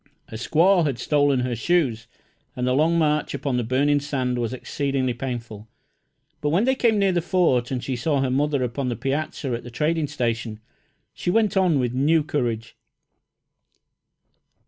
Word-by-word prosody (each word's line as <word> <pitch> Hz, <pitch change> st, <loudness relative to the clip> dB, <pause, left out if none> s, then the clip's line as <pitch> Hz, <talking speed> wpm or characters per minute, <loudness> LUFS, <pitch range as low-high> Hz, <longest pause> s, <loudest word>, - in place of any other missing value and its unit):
A -, -, -12 dB
squaw 170 Hz, -, +3 dB
had 135 Hz, -4 st, -2 dB
stolen 145 Hz, 0 st, +2 dB
her 125 Hz, -1 st, -2 dB
shoes, 120 Hz, -5 st, 0 dB, 0.5 s
and 125 Hz, -, -2 dB
the 125 Hz, -, +1 dB
long 160 Hz, +5 st, +3 dB
march 150 Hz, -3 st, +1 dB
upon 135 Hz, -2 st, -2 dB
the 120 Hz, -, 0 dB
burning 140 Hz, +5 st, +2 dB
sand 130 Hz, -4 st, -2 dB
was 120 Hz, -1 st, -2 dB
exceedingly 130 Hz, 0 st, -2 dB
painful; 115 Hz, -4 st, -6 dB, 0.7 s
but 150 Hz, -, 0 dB
when 175 Hz, +8 st, +2 dB
they 260 Hz, +2 st, +3 dB
came 235 Hz, -4 st, +2 dB
near 195 Hz, -1 st, +3 dB
the 175 Hz, -1 st, +1 dB
Fort 165 Hz, -9 st, +1 dB
and 130 Hz, -2 st, -3 dB
she 130 Hz, -, -2 dB
saw 140 Hz, +4 st, 0 dB
her 135 Hz, -1 st, 0 dB
mother 140 Hz, 0 st, +1 dB
upon 125 Hz, +2 st, -2 dB
the 120 Hz, -, -2 dB
piazza 140 Hz, 0 st, -3 dB
at 120 Hz, -, -4 dB
the -, -, -9 dB
trading 155 Hz, +5 st, 0 dB
station, 115 Hz, -5 st, -3 dB, 0.5 s
she -, -, -4 dB
went 215 Hz, +1 st, +2 dB
on 185 Hz, -5 st, +3 dB
with 125 Hz, -2 st, 0 dB
new 150 Hz, +5 st, +2 dB
courage. 120 Hz, -6 st, -3 dB
135 Hz, 170 wpm, -23 LUFS, 125-155 Hz, 0.7 s, squaw